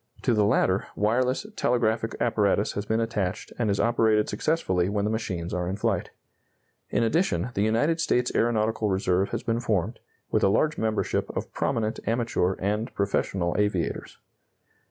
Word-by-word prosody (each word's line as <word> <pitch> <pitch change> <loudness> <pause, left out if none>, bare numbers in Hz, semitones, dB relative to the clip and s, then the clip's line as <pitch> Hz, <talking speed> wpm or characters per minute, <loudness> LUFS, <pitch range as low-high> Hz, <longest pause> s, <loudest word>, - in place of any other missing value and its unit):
To - - +2
the 105 -2 +3
latter, 95 -2 +2
wireless 125 - +1
telegraphic 115 - 0
apparatus 105 -3 +2
has 100 0 -5
been 110 +1 +1
attached 105 -5 -2
and 115 -3 +1
is 100 - 0
operated 110 -2 +2
successfully 100 - 0
when 100 0 0
the 105 - 0
machines 90 -6 -3
are 90 -1 -1
in 95 - -2
flight. 105 - -1 0.8
In - - +1
addition, 115 - +1
the 100 - -1
United 145 +10 +2
States 125 -5 +1
Aeronautical 110 -2 +1
Reserve 95 0 +1
has - - -4
been 115 0 0
formed, 110 -1 -1 0.3
with - - +2
a - - +5
large 155 +10 +2
membership 110 -1 -1
of - - -5
prominent 115 -4 -1
amateur 115 -5 +1
and 105 +5 -2
professional 95 -3 0
aviators. 100 -5 -1
110 Hz, 155 wpm, -26 LUFS, 100-115 Hz, 0.8 s, a